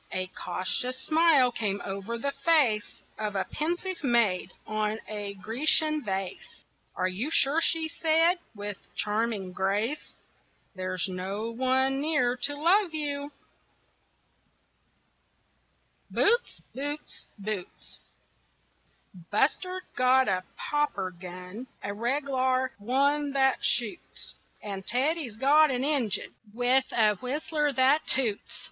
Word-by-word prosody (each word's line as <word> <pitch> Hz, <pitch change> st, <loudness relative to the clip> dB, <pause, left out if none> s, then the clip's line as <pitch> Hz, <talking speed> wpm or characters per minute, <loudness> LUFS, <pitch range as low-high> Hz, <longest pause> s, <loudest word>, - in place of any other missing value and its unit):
A 185 Hz, 0 st, -1 dB
cautious 250 Hz, +7 st, -2 dB
smile 310 Hz, -6 st, +4 dB
came 205 Hz, -4 st, -2 dB
over 200 Hz, +4 st, -4 dB
the 280 Hz, +4 st, -2 dB
face 275 Hz, -10 st, +1 dB, 0.2 s
Of 210 Hz, -1 st, -2 dB
a 190 Hz, -, +1 dB
pensive 345 Hz, +3 st, -3 dB
maid 225 Hz, -8 st, +2 dB
on 215 Hz, 0 st, -1 dB
a 205 Hz, -2 st, -5 dB
Grecian 300 Hz, +9 st, +2 dB
vase 195 Hz, -3 st, -5 dB, 0.3 s
"Are 185 Hz, -, +1 dB
you 200 Hz, +10 st, -2 dB
sure," 305 Hz, 0 st, +3 dB
she 325 Hz, -1 st, +2 dB
said, 330 Hz, +2 st, +2 dB, 0.2 s
with 205 Hz, -1 st, -5 dB, 0.2 s
charming 210 Hz, -3 st, -1 dB
grace, 205 Hz, +9 st, -1 dB, 0.6 s
"There's 185 Hz, -2 st, -2 dB
no 195 Hz, +4 st, -4 dB
one 260 Hz, +2 st, +2 dB
near 290 Hz, -5 st, +2 dB
to 280 Hz, +4 st, -2 dB
love 340 Hz, +3 st, +3 dB
you?" 290 Hz, -1 st, -2 dB, 2.8 s
BOOTS, 475 Hz, +3 st, +1 dB
BOOTS, 290 Hz, +4 st, -5 dB
BOOTS 205 Hz, -2 st, -6 dB, 1.3 s
Buster's 365 Hz, -, +1 dB
got 255 Hz, +1 st, +4 dB
a 185 Hz, -2 st, +1 dB
popper 295 Hz, -11 st, -1 dB
gun, 180 Hz, +6 st, -9 dB, 0.2 s
A 200 Hz, -, -3 dB
reg'lar 260 Hz, +2 st, 0 dB
one 280 Hz, +6 st, +1 dB
that 265 Hz, -1 st, +2 dB
shoots, 240 Hz, +7 st, -1 dB, 0.3 s
And 195 Hz, -2 st, -5 dB
Teddy's 270 Hz, 0 st, 0 dB
got 295 Hz, +5 st, +5 dB
an 255 Hz, -1 st, -1 dB
engine 275 Hz, -8 st, 0 dB, 0.2 s
With 250 Hz, +2 st, +4 dB
a 215 Hz, -3 st, +3 dB
whistler 295 Hz, -, -1 dB
that 265 Hz, +4 st, +3 dB
toots. 235 Hz, -6 st, 0 dB
255 Hz, 110 wpm, -28 LUFS, 205-295 Hz, 2.8 s, got